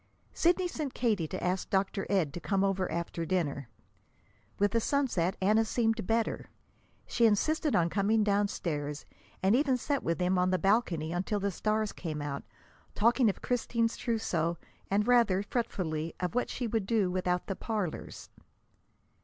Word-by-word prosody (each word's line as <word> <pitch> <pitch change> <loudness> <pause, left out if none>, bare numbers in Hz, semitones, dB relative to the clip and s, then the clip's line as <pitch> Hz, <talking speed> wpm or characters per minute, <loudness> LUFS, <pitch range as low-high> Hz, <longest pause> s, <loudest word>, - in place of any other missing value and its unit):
Sidney 355 +2 +2
sent 305 -6 -4
Katie 210 -9 +1
to 185 - -5
ask 180 +1 -1
Dr. 195 0 0
Ed 175 -8 +1
to - - -5
come 195 +1 0
over 195 -1 0
after 170 0 -3
dinner. 150 -7 -1 0.9
With 205 0 +2
the 230 - +2
sunset 225 -9 0
Anna 215 +4 +3
seemed 225 -2 0
better. 225 0 0 0.6
She 235 -1 +3
insisted 300 +8 +1
on 170 -1 +3
coming 210 +4 +2
downstairs, 170 -8 -1 0.4
and 195 +4 +4
even 270 -1 +2
sat 280 +2 -1
with 165 - -1
them 180 0 +1
on 180 0 +2
the 185 - +2
balcony 180 -6 +1
until 190 +4 -1
the 200 0 -1
stars 215 +2 0
came 155 -3 -5
out, 145 -1 -4 0.5
talking 235 +2 +4
of 195 - -4
Christine's 230 -2 0
trousseau, 175 -8 -1 0.3
and, 205 +2 +2
rather 230 -6 +4
fretfully, 165 -9 -2
of 180 +1 -2
what 245 - 0
she 245 - -3
would 220 -3 -1
do 210 -5 +2
without 180 -1 0
the 195 - -3
parlors. 210 -7 -4
200 Hz, 160 wpm, -30 LUFS, 180-230 Hz, 0.9 s, and